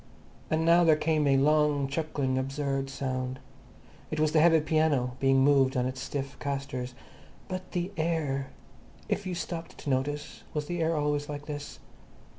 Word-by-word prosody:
And 160 Hz, +1 st, +1 dB
now 170 Hz, +1 st, +6 dB
there 160 Hz, -2 st, +6 dB
came 155 Hz, -1 st, +1 dB
a 135 Hz, -1 st, +4 dB
long, 150 Hz, 0 st, +3 dB
chuckling 140 Hz, -2 st, -1 dB
absurd 135 Hz, 0 st, -2 dB
sound. 130 Hz, -2 st, -3 dB, 0.7 s
It 155 Hz, -, -3 dB
was 155 Hz, 0 st, +3 dB
the 155 Hz, -, +4 dB
heavy 165 Hz, 0 st, +6 dB
piano 150 Hz, -5 st, +1 dB
being 135 Hz, 0 st, +4 dB
moved 135 Hz, -2 st, +4 dB
on 125 Hz, -, +2 dB
its 130 Hz, 0 st, -3 dB
stiff 140 Hz, 0 st, -4 dB
castors. 135 Hz, -3 st, -4 dB, 0.5 s
But 185 Hz, 0 st, -6 dB
the 180 Hz, +1 st, -1 dB
air! 155 Hz, -5 st, -1 dB, 0.6 s
If 200 Hz, 0 st, -1 dB
you 180 Hz, -, -2 dB
stopped 170 Hz, -1 st, -5 dB
to 145 Hz, -, -3 dB
notice, 145 Hz, +3 st, -2 dB
was 150 Hz, -1 st, -1 dB
the 175 Hz, +2 st, -3 dB
air 165 Hz, 0 st, +1 dB
always 145 Hz, -1 st, 0 dB
like 145 Hz, 0 st, -5 dB
this? 145 Hz, -1 st, -6 dB
145 Hz, 165 wpm, -29 LUFS, 135-160 Hz, 0.7 s, now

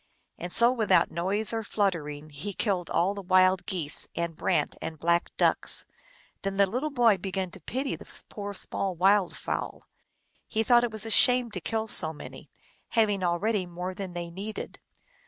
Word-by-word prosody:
And 175 Hz, +1 st, -5 dB
so 235 Hz, +5 st, +4 dB
without 230 Hz, -4 st, +2 dB
noise 200 Hz, +6 st, 0 dB
or 225 Hz, -, -1 dB
fluttering 155 Hz, -8 st, -2 dB
he 170 Hz, +8 st, -5 dB
killed 185 Hz, -6 st, -1 dB
all 185 Hz, +4 st, +1 dB
the 200 Hz, -, -6 dB
Wild 185 Hz, 0 st, +3 dB
Geese 165 Hz, -5 st, +2 dB
and 170 Hz, -1 st, -2 dB
Brant -, -, 0 dB
and 160 Hz, 0 st, -5 dB
Black 170 Hz, +3 st, +1 dB
Ducks. -, -, +2 dB, 0.6 s
Then 195 Hz, 0 st, -3 dB
the 200 Hz, -, +5 dB
little 250 Hz, +10 st, -2 dB
boy 235 Hz, -8 st, +3 dB
began 190 Hz, -1 st, -3 dB
to 190 Hz, -, -10 dB
pity 260 Hz, -, -3 dB
the -, -, -11 dB
poor 205 Hz, -1 st, -6 dB
small 190 Hz, 0 st, -2 dB
wild 190 Hz, +1 st, +3 dB
fowl. -, -, -4 dB, 0.6 s
He 220 Hz, 0 st, 0 dB
thought 240 Hz, +1 st, +5 dB
it 240 Hz, -, 0 dB
was 220 Hz, 0 st, 0 dB
a 225 Hz, -, -3 dB
shame 250 Hz, +1 st, +4 dB
to 185 Hz, -, -5 dB
kill 220 Hz, +4 st, -2 dB
so 160 Hz, -7 st, +3 dB
many, 150 Hz, -, -11 dB, 0.4 s
having 210 Hz, -4 st, +1 dB
al 175 Hz, -1 st, +1 dB
ready 205 Hz, -1 st, -1 dB
more 180 Hz, +2 st, -5 dB
than 190 Hz, -1 st, -6 dB
they 170 Hz, -1 st, -5 dB
needed. 200 Hz, +5 st, -7 dB
195 Hz, 180 wpm, -27 LUFS, 175-220 Hz, 0.6 s, the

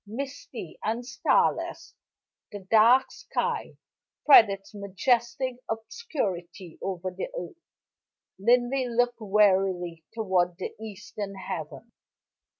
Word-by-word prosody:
Misty 245 Hz, -, -7 dB
and 230 Hz, +3 st, -2 dB
starless, 265 Hz, -, 0 dB, 0.6 s
the 205 Hz, -, -7 dB
dark 235 Hz, +4 st, +6 dB
sky -, -, -3 dB, 0.5 s
spread 235 Hz, -7 st, +8 dB
its 195 Hz, +1 st, -6 dB
majestic 235 Hz, +5 st, 0 dB
obscurity 210 Hz, -, -4 dB
over 185 Hz, -1 st, -3 dB
the 180 Hz, -, -4 dB
earth. 355 Hz, -8 st, -7 dB, 0.8 s
Linley 245 Hz, +4 st, +2 dB
looked 240 Hz, 0 st, +1 dB
wearily 190 Hz, -5 st, +2 dB
toward 185 Hz, -5 st, 0 dB
the 185 Hz, -, -5 dB
eastern 210 Hz, -1 st, -7 dB
heaven. 190 Hz, +4 st, -7 dB
215 Hz, 95 wpm, -27 LUFS, 190-245 Hz, 0.8 s, spread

